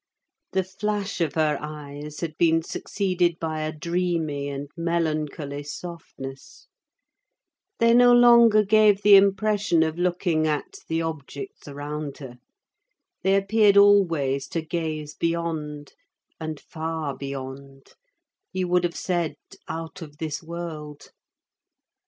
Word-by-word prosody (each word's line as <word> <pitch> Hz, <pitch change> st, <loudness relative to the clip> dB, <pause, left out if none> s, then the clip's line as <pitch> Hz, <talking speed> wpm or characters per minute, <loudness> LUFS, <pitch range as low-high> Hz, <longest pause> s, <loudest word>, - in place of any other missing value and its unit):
The 190 Hz, 0 st, +2 dB
flash 200 Hz, +1 st, -3 dB
of 165 Hz, -, 0 dB
her 155 Hz, -2 st, +1 dB
eyes 150 Hz, 0 st, -8 dB
had 160 Hz, -3 st, -4 dB
been 165 Hz, -1 st, +3 dB
succeeded 175 Hz, -1 st, -1 dB
by 160 Hz, -1 st, -3 dB
a 155 Hz, 0 st, -2 dB
dreamy 160 Hz, -3 st, -2 dB
and 140 Hz, 0 st, -5 dB
melancholy 155 Hz, -4 st, -2 dB
softness; 145 Hz, -, -9 dB, 1.1 s
they 230 Hz, 0 st, +4 dB
no 245 Hz, 0 st, +7 dB
longer 235 Hz, -3 st, +7 dB
gave 210 Hz, -1 st, +4 dB
the 205 Hz, 0 st, +9 dB
impression 200 Hz, -2 st, +3 dB
of 160 Hz, +1 st, -3 dB
looking 175 Hz, -3 st, +1 dB
at 150 Hz, -2 st, -3 dB
the 165 Hz, 0 st, -1 dB
objects 165 Hz, -, -7 dB
around 145 Hz, 0 st, -5 dB
her: 125 Hz, -3 st, -10 dB, 0.8 s
they 190 Hz, +1 st, +3 dB
appeared 200 Hz, +1 st, +4 dB
always 165 Hz, -10 st, +4 dB
to 165 Hz, -, -3 dB
gaze 155 Hz, -2 st, -3 dB
beyond, 160 Hz, -3 st, -3 dB, 0.5 s
and 155 Hz, -2 st, -5 dB
far 160 Hz, -2 st, -4 dB
beyond—you 140 Hz, -, -8 dB
would 180 Hz, 0 st, +2 dB
have 175 Hz, -1 st, -2 dB
said 170 Hz, -5 st, -1 dB, 0.3 s
out 165 Hz, +2 st, -6 dB
of 150 Hz, -2 st, -10 dB
this 155 Hz, -2 st, -4 dB
world. 160 Hz, -3 st, -7 dB
165 Hz, 115 wpm, -25 LUFS, 150-185 Hz, 1.1 s, the